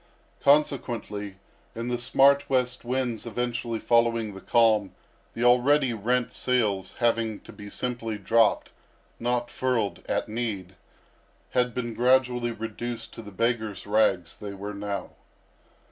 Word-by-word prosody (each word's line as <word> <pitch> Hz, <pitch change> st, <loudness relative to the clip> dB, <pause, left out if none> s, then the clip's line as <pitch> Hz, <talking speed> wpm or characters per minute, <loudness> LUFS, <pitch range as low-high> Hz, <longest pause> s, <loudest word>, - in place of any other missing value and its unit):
Consequently, 120 Hz, -8 st, +1 dB, 0.4 s
in 115 Hz, +1 st, -4 dB
the 120 Hz, -1 st, -1 dB
smart 140 Hz, +2 st, +4 dB
west 125 Hz, -1 st, 0 dB
winds 120 Hz, -2 st, -2 dB
eventually 120 Hz, 0 st, -2 dB
following 115 Hz, -2 st, +2 dB
the 95 Hz, -, -10 dB
calm, 110 Hz, -4 st, +3 dB, 0.4 s
the 115 Hz, -, -2 dB
already 125 Hz, +2 st, +4 dB
rent 120 Hz, +3 st, 0 dB
sails, 110 Hz, -7 st, 0 dB
having 115 Hz, -3 st, +1 dB
to -, -, -13 dB
be 105 Hz, -1 st, -10 dB
simply 115 Hz, -2 st, -3 dB
dropped, 110 Hz, +3 st, +2 dB, 0.5 s
not 120 Hz, 0 st, -1 dB
furled, 125 Hz, -6 st, -1 dB
at -, -, 0 dB
need, 105 Hz, -5 st, -4 dB, 0.8 s
had 125 Hz, -1 st, +1 dB
been 120 Hz, -2 st, -3 dB
gradually 125 Hz, 0 st, +2 dB
reduced 115 Hz, +1 st, -6 dB
to -, -, -8 dB
the 105 Hz, -, -10 dB
beggars' 110 Hz, 0 st, -1 dB
rags 100 Hz, -5 st, +2 dB
they 100 Hz, -1 st, -7 dB
were 100 Hz, +2 st, -6 dB
now. 100 Hz, -1 st, -4 dB
115 Hz, 130 wpm, -26 LUFS, 105-125 Hz, 0.8 s, smart